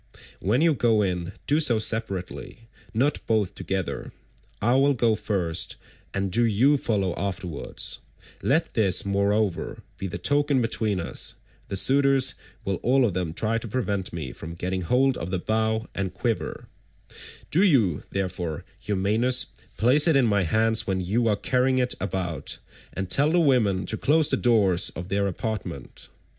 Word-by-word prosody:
When 110 Hz, +9 st, +1 dB
you 165 Hz, -1 st, +4 dB
go 115 Hz, -5 st, +2 dB
in, 90 Hz, -1 st, -2 dB
do 150 Hz, +2 st, +3 dB
so 130 Hz, -8 st, +3 dB
separately, 110 Hz, 0 st, -3 dB, 0.2 s
not 130 Hz, +6 st, +1 dB
both 110 Hz, -4 st, +1 dB
together; 95 Hz, -2 st, -4 dB, 0.5 s
I 120 Hz, +4 st, +2 dB
will 140 Hz, +1 st, +3 dB
go 115 Hz, -1 st, +2 dB
first, 90 Hz, -6 st, -1 dB, 0.4 s
and 100 Hz, -1 st, -2 dB
do 120 Hz, +6 st, +3 dB
you 120 Hz, +6 st, +4 dB
follow 100 Hz, -8 st, 0 dB
afterwards; 95 Hz, -4 st, -3 dB, 0.4 s
let 160 Hz, +5 st, +1 dB
this 100 Hz, -5 st, +3 dB
moreover 100 Hz, -1 st, 0 dB, 0.2 s
be 95 Hz, -, -3 dB
the 85 Hz, -, -5 dB
token 145 Hz, +8 st, +2 dB
between 110 Hz, -4 st, 0 dB
us; 85 Hz, -, -2 dB, 0.3 s
the -, -, -4 dB
suitors 135 Hz, +3 st, +4 dB, 0.3 s
will 95 Hz, -1 st, -1 dB
all 130 Hz, +1 st, +3 dB
of 105 Hz, -, 0 dB
them 90 Hz, -3 st, -2 dB
try 110 Hz, +7 st, 0 dB
to 115 Hz, -, -7 dB
prevent 100 Hz, -5 st, -2 dB
me 80 Hz, -6 st, -5 dB
from 85 Hz, +1 st, -8 dB
getting 90 Hz, +2 st, -3 dB
hold 125 Hz, +9 st, +2 dB
of 85 Hz, -, -4 dB
the 95 Hz, -, -1 dB
bow 110 Hz, +3 st, 0 dB
and 95 Hz, -3 st, -3 dB
quiver; -, -, -3 dB, 0.8 s
do 170 Hz, -, +4 dB
you, 115 Hz, -, +3 dB
therefore, 90 Hz, -5 st, -3 dB, 0.2 s
Eumaeus, 110 Hz, +6 st, +2 dB, 0.3 s
place 135 Hz, -, +4 dB
it 160 Hz, -, +4 dB
in 135 Hz, -3 st, +4 dB
my 100 Hz, -3 st, +2 dB
hands 110 Hz, +4 st, +2 dB
when 95 Hz, -1 st, 0 dB
you 105 Hz, +6 st, 0 dB
are 105 Hz, -, +3 dB
carrying 130 Hz, +4 st, +1 dB
it 125 Hz, -1 st, +1 dB
about, 90 Hz, -7 st, -3 dB, 0.3 s
and 95 Hz, 0 st, -4 dB
tell 145 Hz, +2 st, +4 dB
the 175 Hz, +2 st, +3 dB
women 115 Hz, -, +2 dB
to 110 Hz, -, -3 dB
close 155 Hz, +4 st, +3 dB
the -, -, +3 dB
doors 105 Hz, -8 st, +3 dB
of 90 Hz, +2 st, -6 dB
their 100 Hz, +1 st, +1 dB
apartment. 95 Hz, -, -5 dB
110 Hz, 160 wpm, -25 LUFS, 95-125 Hz, 0.8 s, you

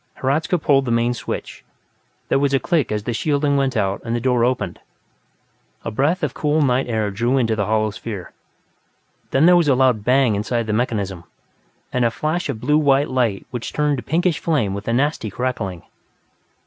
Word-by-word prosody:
Hradzka 155 Hz, +7 st, 0 dB
pulled 140 Hz, -4 st, +2 dB
the -, -, -3 dB
main 115 Hz, +1 st, +2 dB
switch; 120 Hz, -, -6 dB, 0.6 s
there -, -, +2 dB
was 140 Hz, -1 st, +2 dB
a -, -, +3 dB
click 155 Hz, -5 st, 0 dB
as 105 Hz, -1 st, -2 dB
the 120 Hz, -, -2 dB
shielding 145 Hz, +3 st, +1 dB
went 135 Hz, -2 st, 0 dB
out 95 Hz, 0 st, 0 dB
and 115 Hz, 0 st, -2 dB
the -, -, 0 dB
door 125 Hz, -1 st, +1 dB
opened. 125 Hz, +1 st, -1 dB, 1.1 s
A 115 Hz, -, -2 dB
breath 155 Hz, -, 0 dB
of 145 Hz, -, -1 dB
cool 150 Hz, +1 st, 0 dB
night 130 Hz, -1 st, +1 dB
air 110 Hz, -3 st, 0 dB
drew 120 Hz, +6 st, 0 dB
into 115 Hz, -4 st, +1 dB
the 105 Hz, -3 st, -1 dB
hollow 110 Hz, 0 st, +1 dB
sphere. 105 Hz, -3 st, -7 dB, 1.0 s
Then 135 Hz, +4 st, +3 dB
there 180 Hz, +1 st, +7 dB
was 170 Hz, -3 st, +3 dB
a 135 Hz, -, +4 dB
loud 125 Hz, -5 st, +2 dB
bang 125 Hz, -1 st, +3 dB
inside 115 Hz, +3 st, -1 dB
the 110 Hz, -, -2 dB
mechanism, 100 Hz, -6 st, -2 dB, 0.7 s
and 125 Hz, -, +1 dB
a 120 Hz, -, +4 dB
flash 155 Hz, +8 st, -2 dB
of 110 Hz, -, -3 dB
blue 150 Hz, +6 st, +2 dB
white 140 Hz, -1 st, +3 dB
light 120 Hz, -6 st, 0 dB
which 120 Hz, -3 st, -5 dB
turned 150 Hz, -1 st, +1 dB
to 120 Hz, -, -6 dB
pinkish 170 Hz, +2 st, 0 dB
flame 140 Hz, -, 0 dB
with 100 Hz, +1 st, -6 dB
a 115 Hz, -, +1 dB
nasty 135 Hz, -3 st, 0 dB
crackling. 100 Hz, -5 st, -3 dB
125 Hz, 195 wpm, -21 LUFS, 110-145 Hz, 1.1 s, there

